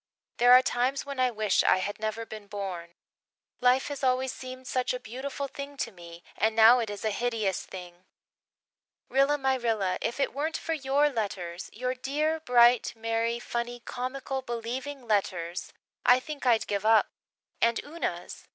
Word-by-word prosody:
There 245 +1 +5
are 255 +1 +8
times 255 +2 0
when 280 -2 -6
I 255 0 +4
wish 215 -4 +1
I - - +4
had 200 +3 -3
never 220 +1 -3
been 215 -2 -9
born. 185 -4 -6 0.6
Life 250 +1 +3
has 285 -1 -6
always 260 0 +2
seemed 255 0 -9
such 255 0 -1
a - - -4
beautiful 260 +4 -5
thing 280 +1 -8
to 230 - -2
me 170 -2 -12
and 220 0 +1
now 225 +3 +8
it 225 -3 -2
is 205 +1 -6
a 215 - +1
hideous 220 -3 -1
thing. 180 -1 -11 1.0
Rilla 275 +2 +3
my 265 -1 +1
Rilla, 220 -7 0
if 235 +4 -2
it 275 - 0
weren't 305 +3 -2
for 330 - -3
your 285 0 +2
letters 190 -7 -4
your 250 +3 -2
dear, 300 +5 -1
bright, 245 -4 +4
merry, 230 +1 -1
funny, 240 0 -4
comical, 260 +2 -4
believing 250 +3 -5
letters 180 -5 -1 0.3
I 250 +1 +6
think 285 0 -6
I'd 230 -2 +4
give 200 -1 -2
up. 220 0 +5 0.5
And 230 0 +3
Una's! 325 +4 -5
240 Hz, 170 wpm, -28 LUFS, 215-265 Hz, 1.0 s, are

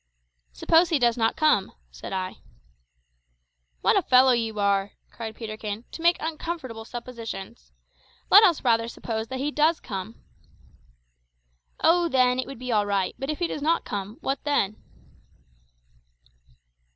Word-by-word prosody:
"Suppose 325 - +3
he 325 - +2
does 240 -3 +2
not 225 -1 +1
come," 305 -11 +2 0.2
said - - -9
I. 185 -1 -4 1.4
"What - - +3
a - - +4
fellow 255 +1 +5
you 225 -3 -1
are," 200 0 +1 0.2
cried 220 -2 -7
Peterkin, 215 0 -6
"to - - -8
make 345 +1 +4
uncomfortable 310 -8 -5
suppositions! 225 - -8 0.6
Let 410 +3 +10
us 350 -7 +3
rather 230 -2 +2
suppose 225 -1 -4
that 260 - -5
he 285 +3 -2
does 310 +3 +2
come." 195 0 -6 1.7
"Oh, 345 +1 +4
then, 255 -4 +2
it 255 - -2
would 275 - -8
be 250 +1 -5
all 210 -2 +2
right; 195 -2 0
but 270 +1 -4
if 305 - -2
he 350 - -1
does 300 - -4
not 325 +3 +1
come, 205 +1 -5
what 270 +1 -2
then?" 215 -8 0
240 Hz, 145 wpm, -25 LUFS, 215-295 Hz, 1.7 s, Let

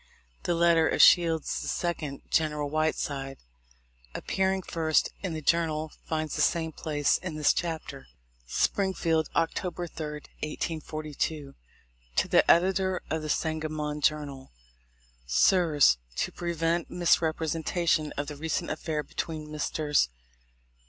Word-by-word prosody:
The 175 - +1
letter 165 -1 +4
of - - -1
Shields' 165 -3 +5
second, 155 -5 -3
General 150 -2 +1
Whiteside, 145 -3 -1 0.8
appearing 190 0 0
first 160 -2 +1
in 185 -4 -3
the 155 -1 -5
Journal, 160 -1 +1 0.2
finds 155 -2 -2
the - - 0
same 160 -1 +1
place 145 -2 0
in 175 -4 -5
this 150 -1 +3
chapter: 160 -5 -4 0.4
"Springfield, 165 - +1
Oct. 165 -1 +2
3, 180 -2 -3
1842. 155 -2 -4 0.6
"To - - +2
the - - +4
Editor 190 +1 +3
of 160 0 0
the 155 - -5
Sangamon 155 -1 -2
Journal: 145 -3 -1 0.8
"Sirs: 145 - +4 0.2
To - - -1
prevent 170 -1 -1
misrepresentation 160 -1 +1
of 145 - -1
the 150 - -7
recent 160 +3 -2
affair 155 -2 -2
between 155 -1 -5
Messrs. 150 - +1
160 Hz, 115 wpm, -28 LUFS, 150-170 Hz, 0.8 s, Shields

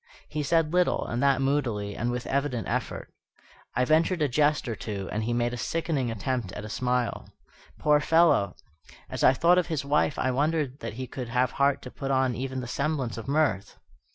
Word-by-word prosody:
He 150 - -2
said 160 +2 +1
little, 180 0 +2
and 120 +1 -2
that 135 -1 +3
moodily, 120 -8 -1
and 120 - -1
with 125 0 -3
evident 135 -4 -1
effort. - - -3 0.6
I 125 +1 +2
ventured 160 +3 +2
a - - +3
jest 145 +2 +2
or 115 - -2
two, 100 -3 -5
and 110 +1 -2
he 120 - -1
made 120 0 0
a - - -4
sickening 155 -2 -1
attempt 115 -1 -2
at 105 - -6
a - - -7
smile. 125 +1 -1 0.5
Poor 150 -1 +4
fellow! 160 -9 +3 0.6
as - - -3
I - - +7
thought 175 +6 +4
of 180 - -1
his 155 -4 -2
wife 150 +1 +1
I 130 - +1
wondered 145 0 0
that - - -5
he 130 +3 -5
could 125 -1 -6
have 125 +2 +1
heart 140 0 +1
to 125 - -8
put 135 - -5
on 130 -2 +2
even 130 +1 -4
the 125 - -6
semblance 140 -3 -2
of 115 +2 -7
mirth. 140 -10 0
130 Hz, 205 wpm, -27 LUFS, 120-150 Hz, 0.6 s, I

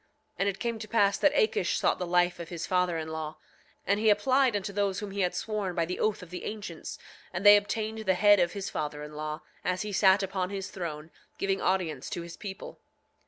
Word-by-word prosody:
9:5 - - -39 0.3
And 195 - +2
it 195 - -4
came 235 -1 -2
to 215 - -7
pass 205 -3 +3
that 295 - +4
Akish 455 -3 +2
sought - - +1
the 180 - -2
life 175 0 +2
of 170 - -7
his 170 -1 -4
father 180 -2 +1
in 160 0 -4
law; 160 -1 -5 0.5
and 200 +1 +2
he 220 0 +4
applied 255 +4 +3
unto 200 0 -3
those 200 -1 0
whom 205 -1 -5
he 200 0 -2
had 180 -1 0
sworn 210 -5 -2
by 170 -2 +1
the 180 +2 -4
oath 215 -3 0
of 175 - -13
the 180 - -6
ancients, 205 -7 -6 0.3
and 175 +4 -4
they 205 0 +11
obtained 215 +2 -1
the 190 -4 +1
head 205 +1 +6
of 175 -1 +2
his 195 -1 -4
father 150 -1 -4
in 150 0 -9
law, 155 +1 -5 0.2
as 180 +1 -1
he 210 - -4
sat 195 0 +5
upon 190 -1 -2
his 195 -1 -5
throne, 160 -3 -6 0.3
giving 195 0 0
audience 170 -8 0
to 170 - -4
his 170 0 -9
people. 195 0 -8
190 Hz, 235 wpm, -29 LUFS, 175-205 Hz, 0.5 s, they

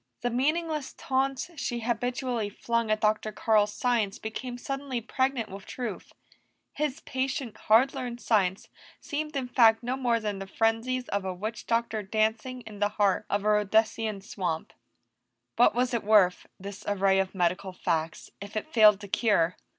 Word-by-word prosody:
The 245 - -1
meaningless 305 +3 -1
taunts 270 +4 -1
she 240 -3 -2
habitually 245 -1 -1
flung 230 +2 -1
at 215 0 +1
Dr. 215 0 +1
Carl's 210 -1 +2
science 230 -5 0
became 245 +3 -6
suddenly 275 -1 -4
pregnant 260 0 -1
with 195 0 -10
truth; 235 -6 -5 0.6
his 295 -3 -2
patient, 265 -3 -3
hard 235 +5 +4
learned 245 -3 -5
science 195 -6 +1 0.3
seemed 300 +1 -4
in 265 -2 -1
fact 230 -2 +5
no 250 +2 -1
more 245 -3 +1
than 210 -3 -3
the 195 - -6
frenzies 225 +5 0
of 200 -1 -1
a 190 -1 -3
witch 215 +5 -5
doctor 230 -2 0
dancing 220 +5 -1
in 215 -3 -11
the 205 0 +2
heart 200 -3 +2
of 205 0 0
a - - +3
Rhodesian 215 0 +1
swamp. 180 -5 -4 0.8
What 230 -2 +5
was 250 +1 +1
it 235 - 0
worth 200 -4 +4
this 200 +1 -8
array 195 -1 +3
of 190 0 -1
medical 185 +1 0
facts 165 -3 -2
if 200 +1 -6
it 310 +9 -5
failed 215 -3 +7
to 200 - -8
cure? 195 -5 +2
220 Hz, 165 wpm, -28 LUFS, 205-250 Hz, 0.8 s, failed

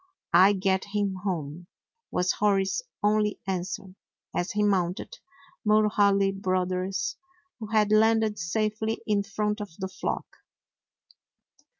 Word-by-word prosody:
"I 190 +4 +7
get 190 -1 0
him 200 -2 0
home," 170 -3 -4 0.4
was 180 0 +1
Hori's 195 - +1 0.2
only 210 0 +2
answer, 185 0 -4 0.4
as 175 - -1
he 210 0 +1
mounted 185 -3 0 0.4
Mulhaly 205 -2 +3
Brothers, 185 0 -1 0.4
who 220 - -6
had 215 -1 +2
landed 220 0 +3
safely 215 +5 -1
in 210 -2 +2
front 210 +2 -2
of 205 - -5
the 190 - -3
flock. 190 - -3
200 Hz, 110 wpm, -27 LUFS, 185-210 Hz, 0.4 s, I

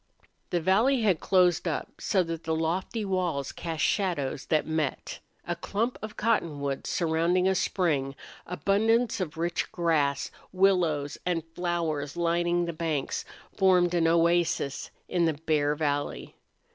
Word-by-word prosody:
The 175 - +1
valley 220 +10 +3
had 190 -7 +3
closed 180 -2 +3
up, 160 - -2
so 190 -2 +2
that 165 -1 -5
the 160 0 -1
lofty 180 +7 -1
walls 175 -8 -1
cast 165 -3 -4
shadows 170 -9 0
that 155 - +2
met. 155 -3 -2 0.3
A 175 - -2
clump 220 +8 -2
of 215 0 -7
cottonwoods 150 -11 -1
surrounding 170 +2 +1
a 190 - +3
spring, 150 -8 0 0.3
abundance 220 +6 +1
of 165 -4 -4
rich 170 +1 -1
grass, 155 -5 +1 0.2
willows 175 -7 +2
and 175 -2 -1
flowers 165 -4 -2
lining 175 0 +1
the 170 - -4
banks, 160 -4 -2 0.3
formed 180 -3 +4
an 170 -2 +3
oasis 170 -3 +1 0.2
in 175 -2 +1
the 160 - +2
bare 150 -1 +1
valley. 145 -2 -2
170 Hz, 135 wpm, -28 LUFS, 155-185 Hz, 0.3 s, formed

